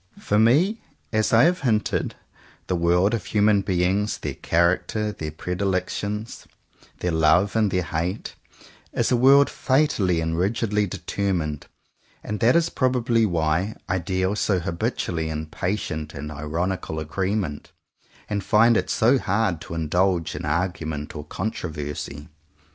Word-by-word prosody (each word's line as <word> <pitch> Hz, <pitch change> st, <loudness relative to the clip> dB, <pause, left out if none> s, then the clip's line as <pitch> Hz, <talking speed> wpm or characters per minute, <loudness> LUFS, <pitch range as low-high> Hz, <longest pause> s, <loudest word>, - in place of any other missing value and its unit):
For 105 Hz, -, 0 dB
me 155 Hz, -, +3 dB, 0.3 s
as 110 Hz, 0 st, +2 dB
I 115 Hz, +1 st, +6 dB
have 175 Hz, +2 st, +3 dB
hinted, 110 Hz, -6 st, 0 dB, 0.5 s
the 90 Hz, -, -1 dB
world 90 Hz, +5 st, +2 dB
of 115 Hz, -5 st, -1 dB
human 105 Hz, +1 st, +3 dB
beings, 95 Hz, +2 st, 0 dB
their -, -, -4 dB
character, 95 Hz, +5 st, +1 dB
their 80 Hz, -6 st, -5 dB
pre 80 Hz, +4 st, -5 dB
dilections, 100 Hz, +3 st, -3 dB, 0.5 s
their 90 Hz, -, 0 dB
love 85 Hz, +6 st, +3 dB
and 110 Hz, -2 st, +3 dB
their 90 Hz, -1 st, 0 dB
hate, 85 Hz, +5 st, -3 dB, 0.6 s
is -, -, 0 dB
a -, -, +5 dB
world 135 Hz, +3 st, +6 dB
fatally, 130 Hz, -, +1 dB
and 80 Hz, 0 st, -1 dB
rigidly 105 Hz, +3 st, 0 dB
determined; 90 Hz, -6 st, -2 dB, 0.6 s
and 105 Hz, -1 st, -4 dB
that 120 Hz, +3 st, +4 dB
is 170 Hz, 0 st, +2 dB
probably 120 Hz, -3 st, +2 dB
why 85 Hz, +4 st, 0 dB
I 95 Hz, +1 st, 0 dB
deal 95 Hz, +3 st, -1 dB
so 100 Hz, -2 st, +1 dB
habitually 85 Hz, -1 st, -2 dB
in 80 Hz, 0 st, -3 dB
patient 80 Hz, -2 st, -3 dB
and 75 Hz, +2 st, -6 dB
ironical 80 Hz, +3 st, -3 dB
agreement, 95 Hz, 0 st, -3 dB, 0.6 s
and 100 Hz, -2 st, -2 dB
find 115 Hz, +2 st, +4 dB
it -, -, -1 dB
so 125 Hz, +4 st, +3 dB
hard 100 Hz, -6 st, 0 dB
to 85 Hz, -, -7 dB
indulge 85 Hz, +2 st, 0 dB
in -, -, -5 dB
argument 80 Hz, -2 st, -2 dB
or 75 Hz, -1 st, -6 dB
contro 95 Hz, +3 st, -4 dB
versy. 75 Hz, -1 st, -6 dB
95 Hz, 140 wpm, -24 LUFS, 80-110 Hz, 0.6 s, I